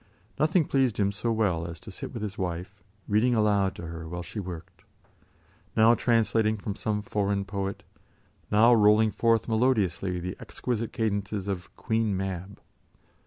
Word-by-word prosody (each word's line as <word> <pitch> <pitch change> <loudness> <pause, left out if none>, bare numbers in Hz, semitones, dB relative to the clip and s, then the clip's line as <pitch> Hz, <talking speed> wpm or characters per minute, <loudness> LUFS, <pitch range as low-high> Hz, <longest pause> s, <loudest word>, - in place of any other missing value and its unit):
Nothing 160 +1 +3
pleased 130 -7 +1
him 100 -1 +2
so 110 +4 -2
well 95 -7 0
as 85 -1 -7
to - - -9
sit - - -6
with 115 - -5
his 105 -1 -4
wife, 95 +1 -4 0.3
reading 115 +4 +3
aloud 105 -3 +2
to 85 - -7
her 80 0 -7
while 85 +1 -5
she 105 - -6
worked; 90 -4 -8 1.0
now 110 +1 +7
translating 115 -2 +2
from 100 0 -4
some 105 0 -2
foreign 100 -1 -1
poet, 100 0 -4 0.7
now 110 +3 +6
rolling 105 0 +5
forth 115 0 +2
melodiously 105 -6 +1
the 90 +1 -5
exquisite 115 -2 -3
cadences 100 -3 -2
of 95 -3 -4
"Queen 110 -4 0
Mab." 95 +1 -5
105 Hz, 155 wpm, -27 LUFS, 95-110 Hz, 1.0 s, now